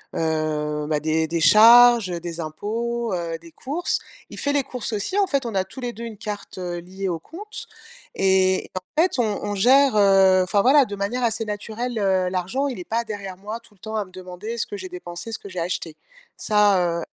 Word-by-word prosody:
heu, 155 Hz, -2 st, -1 dB
bah, 150 Hz, -1 st, 0 dB
des 160 Hz, +1 st, 0 dB
des 165 Hz, +1 st, -1 dB
charges, 230 Hz, +3 st, +7 dB
heu, 170 Hz, -, -3 dB
des 170 Hz, 0 st, -7 dB
impôts, 225 Hz, +8 st, -3 dB
heu, 165 Hz, -2 st, -4 dB
des 165 Hz, 0 st, -15 dB
courses. 295 Hz, -, -2 dB, 0.3 s
Il -, -, -10 dB
fait 285 Hz, -, 0 dB
les 285 Hz, -, +3 dB
courses 250 Hz, -4 st, -5 dB
aussi, 210 Hz, -, -2 dB
en 405 Hz, -, +4 dB
fait 280 Hz, -7 st, 0 dB
on 225 Hz, -, -5 dB
a 190 Hz, -, +2 dB
tous 190 Hz, +8 st, -12 dB
les 245 Hz, -, -3 dB
2 235 Hz, 0 st, -9 dB
une 225 Hz, -3 st, -7 dB
carte, 210 Hz, -3 st, -6 dB
heu, 175 Hz, -1 st, -4 dB
liée 190 Hz, +3 st, -6 dB
au 170 Hz, -, -1 dB
compte 410 Hz, -, -9 dB, 0.5 s
et 190 Hz, -1 st, +2 dB
en 185 Hz, +12 st, -1 dB
fait, 355 Hz, -6 st, +1 dB
on 215 Hz, -4 st, 0 dB
on 205 Hz, 0 st, -2 dB
gère, 265 Hz, +5 st, +5 dB
heu, 195 Hz, -2 st, +5 dB
enfin 200 Hz, +2 st, +2 dB
voilà, 275 Hz, +3 st, +5 dB
de 205 Hz, -, -6 dB
manière 205 Hz, +6 st, -2 dB
assez 225 Hz, -1 st, 0 dB
naturelle, 220 Hz, +3 st, -4 dB
heu, 190 Hz, -3 st, +1 dB
l'argent. 190 Hz, +10 st, -1 dB
Il 255 Hz, -, -4 dB
est -, -, -5 dB
pas 230 Hz, +1 st, -1 dB
derrière 200 Hz, -4 st, -7 dB
moi, 210 Hz, +4 st, -6 dB
tout 230 Hz, -2 st, -19 dB
le 195 Hz, -, -28 dB
temps, 220 Hz, +3 st, -6 dB
à 210 Hz, -2 st, -1 dB
me 185 Hz, -, -19 dB
demander 185 Hz, +5 st, -7 dB
ce -, -, -1 dB
que 205 Hz, -, -6 dB
j'ai 185 Hz, -1 st, -7 dB
dépensé, 175 Hz, +4 st, -7 dB
ce -, -, -5 dB
que 200 Hz, -, -10 dB
j'ai 185 Hz, -, -5 dB
acheté. 170 Hz, -2 st, -3 dB, 0.4 s
Ça, 195 Hz, -5 st, +2 dB
heu, -, -, -5 dB
200 Hz, 225 wpm, -23 LUFS, 180-235 Hz, 0.5 s, charges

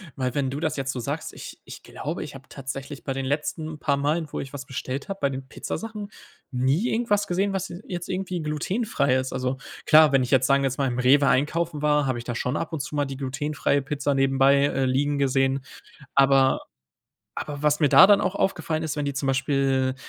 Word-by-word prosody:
weil, 130 Hz, -1 st, -2 dB
wenn 135 Hz, -2 st, 0 dB
du 140 Hz, +2 st, -4 dB
das 160 Hz, -1 st, -1 dB
jetzt 135 Hz, -1 st, -2 dB
so 125 Hz, -, -5 dB
sagst, 150 Hz, +6 st, -4 dB
ich -, -, -10 dB
ich -, -, -11 dB
glaube, 160 Hz, +5 st, -5 dB
ich 145 Hz, -2 st, -9 dB
hab 135 Hz, 0 st, -13 dB
tatsächlich 135 Hz, +1 st, -7 dB
bei 135 Hz, -, -2 dB
den 135 Hz, 0 st, -3 dB
letzten 155 Hz, +2 st, -3 dB
paar 140 Hz, -2 st, +1 dB
Malen, 150 Hz, +3 st, 0 dB
wo -, -, -4 dB
ich 135 Hz, 0 st, -7 dB
was 140 Hz, 0 st, -6 dB
bestellt 135 Hz, +3 st, -5 dB
habe, 195 Hz, -, -4 dB
bei 140 Hz, -, +2 dB
den 130 Hz, 0 st, -6 dB
Pizzasachen 215 Hz, +3 st, -6 dB, 0.4 s
nie 135 Hz, -, +1 dB
irgendwas 210 Hz, -3 st, +1 dB
gesehen, 195 Hz, +3 st, 0 dB
was 190 Hz, 0 st, -2 dB
se 175 Hz, -, -9 dB
jetzt 175 Hz, -2 st, -5 dB
irgendwie 185 Hz, -2 st, -3 dB
glutenfrei 150 Hz, -, 0 dB
ist. 130 Hz, 0 st, -3 dB
Also 130 Hz, 0 st, -2 dB, 0.3 s
klar, 155 Hz, -1 st, +7 dB
wenn 135 Hz, -2 st, +3 dB
ich 125 Hz, -, -4 dB
jetzt, 130 Hz, -1 st, +4 dB
sagen 140 Hz, 0 st, +3 dB
wir -, -, +3 dB
jetzt 130 Hz, -, -6 dB
mal, 135 Hz, -1 st, +1 dB
im 125 Hz, 0 st, -2 dB
Rewe 140 Hz, +3 st, +5 dB
einkaufen 150 Hz, +4 st, +1 dB
war, 150 Hz, -1 st, +2 dB
habe 130 Hz, -2 st, -1 dB
ich 120 Hz, -, -6 dB
da 120 Hz, 0 st, -4 dB
schon 125 Hz, +4 st, -1 dB
ab 165 Hz, -, -4 dB
und 150 Hz, -, -2 dB
zu 150 Hz, -, -6 dB
mal 145 Hz, -1 st, +1 dB
die 135 Hz, -1 st, -6 dB
glutenfreie 140 Hz, +1 st, -1 dB
Pizza 145 Hz, 0 st, -1 dB
nebenbei, 135 Hz, +1 st, +4 dB
äh, 135 Hz, -2 st, 0 dB
liegen 140 Hz, +3 st, +1 dB
gesehen. 135 Hz, 0 st, +2 dB, 0.5 s
Aber 135 Hz, -1 st, +4 dB, 0.7 s
aber 145 Hz, 0 st, -6 dB
was 150 Hz, +1 st, +3 dB
mir 145 Hz, -, +4 dB
da 190 Hz, +3 st, +9 dB
dann 205 Hz, -1 st, +6 dB
auch 190 Hz, +2 st, -1 dB
aufgefallen 160 Hz, -5 st, -1 dB
ist: 155 Hz, -1 st, -3 dB
Wenn 145 Hz, -, -1 dB
die 140 Hz, -, -2 dB
zum 135 Hz, +1 st, -2 dB
Beispiel 135 Hz, -1 st, +1 dB
140 Hz, 225 wpm, -25 LUFS, 135-155 Hz, 0.7 s, da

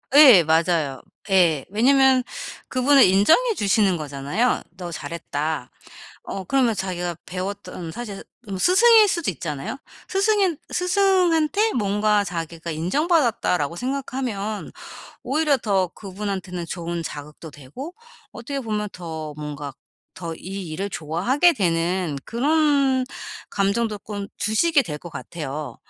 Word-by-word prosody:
예. 260 Hz, -, +9 dB
맞아요. 160 Hz, -3 st, +1 dB, 0.3 s
예. 170 Hz, -7 st, +3 dB
왜냐면 260 Hz, +3 st, +4 dB, 0.4 s
그분을 270 Hz, +2 st, +5 dB
인정해 315 Hz, -, +4 dB
주시는 200 Hz, -, +2 dB
거잖아요. 145 Hz, -, -1 dB, 0.2 s
"너 175 Hz, -2 st, -6 dB
잘했다." 150 Hz, -3 st, -4 dB, 0.5 s
어 195 Hz, -, -5 dB
그러면 245 Hz, +1 st, +2 dB
자기가 180 Hz, -3 st, -3 dB
배웠던 185 Hz, -2 st, -6 dB
사실 215 Hz, -3 st, -7 dB, 0.2 s
음 195 Hz, -, -4 dB
스승일 435 Hz, -, +6 dB
수도 340 Hz, -, 0 dB
있잖아요. 150 Hz, -, -5 dB, 0.3 s
스승인 390 Hz, -3 st, +2 dB, 0.2 s
'스승한테 365 Hz, +1 st, +2 dB
뭔가 210 Hz, -1 st, +2 dB
자기가 170 Hz, -1 st, -5 dB
인정받았다.'라고 195 Hz, -, +1 dB
생각하면 250 Hz, -5 st, -3 dB, 0.5 s
오히려 290 Hz, +2 st, +2 dB
더 195 Hz, -5 st, +1 dB
그분한테는 190 Hz, -2 st, -5 dB
좋은 170 Hz, 0 st, -4 dB
자극도 150 Hz, +1 st, -8 dB
되고 150 Hz, -, -9 dB, 0.4 s
어떻게 275 Hz, +4 st, -5 dB
보면 210 Hz, -3 st, -2 dB
더 160 Hz, -3 st, -6 dB
뭔가 145 Hz, -2 st, -6 dB, 0.4 s
더 165 Hz, -2 st, -6 dB
이 190 Hz, +1 st, -7 dB
일을 190 Hz, +6 st, -3 dB
좋아하게 195 Hz, -, +2 dB
되는 175 Hz, -, 0 dB
그런 280 Hz, 0 st, +2 dB, 0.5 s
감정도 205 Hz, +2 st, 0 dB
꼰 205 Hz, -1 st, -6 dB
주시게 285 Hz, +9 st, +3 dB
될 155 Hz, -, -5 dB
것 175 Hz, -, -10 dB
같아요. 150 Hz, +1 st, -6 dB
200 Hz, 275 characters per minute, -23 LUFS, 165-265 Hz, 0.5 s, 예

